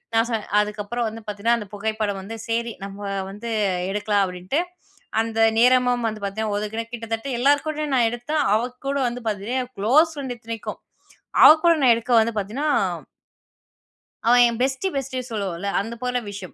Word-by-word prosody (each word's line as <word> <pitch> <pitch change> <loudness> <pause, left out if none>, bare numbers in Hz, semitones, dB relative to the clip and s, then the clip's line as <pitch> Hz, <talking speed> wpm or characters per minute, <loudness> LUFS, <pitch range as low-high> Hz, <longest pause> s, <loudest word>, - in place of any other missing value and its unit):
நான் 225 +1 +3
சொ 230 - 0 0.2
அதுக்கப்புறம் 210 +3 -2
வந்து 225 +1 -9
பார்த்தீன்னா, 210 +3 +1
அந்த 210 -3 -7
புகைப்படம் 215 -1 -2
வந்து, 220 +4 -7
"சரி, 230 0 -1
நம்ம 195 0 -9 0.3
வந்து 210 +4 -7 0.4
எடுக்கல்லாம்." 205 0 +1
அப்பிடின்ட்டு. 185 - -2 0.6
அந்த 225 0 -3 0.2
நேரமும் 245 -1 +4
வந்து 215 -1 -8
பார்த்தீன்னா, 210 +1 -2
ஒதுக்கினேன். 220 +3 -4
கிட்டத்தட்ட 230 +1 -4
எல்லார்கூடயும் 290 +2 +1
நான் 235 -2 +4
எடுத்தேன். 285 +5 -1
அவ 220 - +2 0.3
கூட 280 - 0
வந்து 240 0 -5
பார்த்தீன்னா, 215 +5 -2
என் 250 +1 -14
குளோஸ் 300 +11 +4
ஃப்ரெண்ட் 265 -3 -4
இத்தனைக்கும். 225 -1 -6 0.6
அவ - - +12 0.2
கூட 335 - +7
நான் 245 -3 +6
எடுக்க 235 +2 -2
வந்து 230 0 -1
பார்த்தீன்னா 235 +10 -3 1.6
அவன் 245 0 +7
என் 230 0 -5
பெஸ்டி 270 +8 0
பெஸ்டி 265 -1 -3
சொல்லுவோன்ல, 200 -3 -3
அந்த 225 +3 -6
போல 250 0 0
விஷயம். 195 -2 -8
230 Hz, 160 wpm, -23 LUFS, 210-250 Hz, 1.6 s, அவ